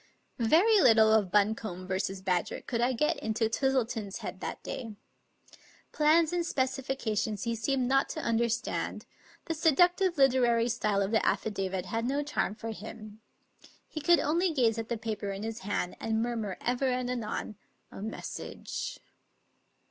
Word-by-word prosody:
Very 360 Hz, -, +5 dB
little 220 Hz, -4 st, +6 dB
of 205 Hz, -5 st, +2 dB
Buncombe 205 Hz, -3 st, 0 dB
v. 190 Hz, 0 st, -1 dB
Badger 180 Hz, -2 st, 0 dB
could 235 Hz, -2 st, -2 dB
I 245 Hz, +2 st, +3 dB
get 260 Hz, +5 st, +1 dB
into 220 Hz, +1 st, 0 dB
Twis 265 Hz, +4 st, +1 dB
tleton's 225 Hz, -6 st, -2 dB
head -, -, -6 dB
that -, -, -6 dB
day. 225 Hz, -4 st, -6 dB, 1.0 s
Plans 315 Hz, +2 st, +3 dB
and 350 Hz, -1 st, +1 dB
specifications 260 Hz, -, -1 dB
he 230 Hz, -1 st, -1 dB
seemed 250 Hz, +3 st, 0 dB
not 270 Hz, +1 st, +2 dB
to -, -, -4 dB
understand; 235 Hz, -2 st, -1 dB, 0.4 s
the 330 Hz, -, -2 dB
seductive 350 Hz, +3 st, +3 dB
literary 245 Hz, -3 st, +4 dB
style 215 Hz, -4 st, +1 dB
of 195 Hz, -, -2 dB
the 220 Hz, -, +4 dB
affi 220 Hz, -, 0 dB
davit 190 Hz, -2 st, -2 dB
had 225 Hz, +4 st, -2 dB
no 280 Hz, +2 st, 0 dB
charm 290 Hz, -7 st, -1 dB
for 225 Hz, +1 st, -5 dB
him. 215 Hz, 0 st, -9 dB, 0.7 s
He 310 Hz, -, -6 dB
could 345 Hz, +3 st, +5 dB
only 340 Hz, +5 st, +1 dB
gaze 235 Hz, -7 st, +2 dB
at 225 Hz, -, -5 dB
the 235 Hz, -, -1 dB
paper 215 Hz, -2 st, -4 dB
in 195 Hz, +1 st, -5 dB
his 225 Hz, 0 st, -4 dB
hand, 190 Hz, -2 st, -2 dB
and 220 Hz, 0 st, -1 dB
murmur 225 Hz, -5 st, -3 dB
ever 250 Hz, +2 st, 0 dB
and 250 Hz, -1 st, 0 dB
anon, 225 Hz, -4 st, -4 dB, 0.2 s
" -, -, -43 dB
A -, -, -9 dB
mes 220 Hz, +2 st, -5 dB
sage!" -, -, -5 dB
230 Hz, 165 wpm, -30 LUFS, 215-270 Hz, 1.0 s, little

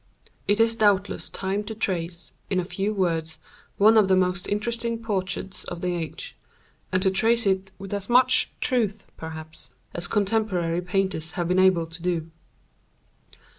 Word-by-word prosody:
It 205 Hz, +1 st, +2 dB
is 225 Hz, 0 st, +4 dB
doubtless 205 Hz, -3 st, +2 dB
time 195 Hz, +2 st, -2 dB
to 220 Hz, +1 st, -6 dB
trace, 175 Hz, -4 st, -3 dB, 0.2 s
in 190 Hz, -, +1 dB
a 180 Hz, -, -2 dB
few 195 Hz, +3 st, -2 dB
words, 165 Hz, -5 st, -1 dB, 0.4 s
one 220 Hz, +2 st, +6 dB
of 205 Hz, -, +4 dB
the 190 Hz, -, +4 dB
most 180 Hz, -1 st, 0 dB
interesting 230 Hz, +2 st, -1 dB
portraits 195 Hz, -4 st, -3 dB
of 175 Hz, -1 st, -6 dB
the 180 Hz, 0 st, 0 dB
age, 165 Hz, -4 st, -6 dB, 0.6 s
and 185 Hz, 0 st, +1 dB
to 190 Hz, -, +3 dB
trace 225 Hz, +4 st, +2 dB
it 190 Hz, 0 st, +1 dB
with 195 Hz, 0 st, -7 dB
as 200 Hz, +1 st, -3 dB
much 255 Hz, +1 st, +5 dB
truth, 220 Hz, -5 st, 0 dB
perhaps, 160 Hz, 0 st, -8 dB, 0.2 s
as 175 Hz, -, -3 dB
contemporary 195 Hz, -5 st, 0 dB
painters 180 Hz, -3 st, -1 dB
have 175 Hz, -3 st, -2 dB
been 180 Hz, +1 st, +2 dB
able 185 Hz, -3 st, +4 dB
to 165 Hz, +1 st, -11 dB
do. 165 Hz, -2 st, -2 dB
190 Hz, 160 wpm, -25 LUFS, 175-210 Hz, 0.6 s, one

